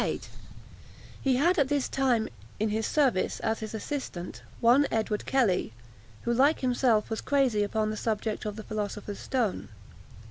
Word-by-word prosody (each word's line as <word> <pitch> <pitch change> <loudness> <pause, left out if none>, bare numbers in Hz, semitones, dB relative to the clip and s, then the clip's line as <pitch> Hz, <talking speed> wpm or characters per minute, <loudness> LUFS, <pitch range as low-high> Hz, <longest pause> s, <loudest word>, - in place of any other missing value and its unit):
] - - -20
He 265 -2 +2
had 340 +7 +3
at 280 - +3
this 285 -1 0
time 250 -5 +1 0.3
in 215 +1 +1
his 220 +1 -1
service, 265 -10 +1
as 220 0 0
his 220 0 -5
assistant, 220 - -5 0.2
one 250 +5 +5
Edward 215 -1 -1
Kelly, 215 - +2 0.5
who, 235 - +1
like 280 +6 +3
himself, 245 -4 +2
was 220 - -2
crazy 265 -7 +2
upon 215 +1 0
the - - -3
subject 215 0 -2
of 210 -1 -3
the 215 - -7
philosopher's 210 -1 -4
stone. 245 -7 -1
225 Hz, 155 wpm, -28 LUFS, 215-265 Hz, 0.5 s, one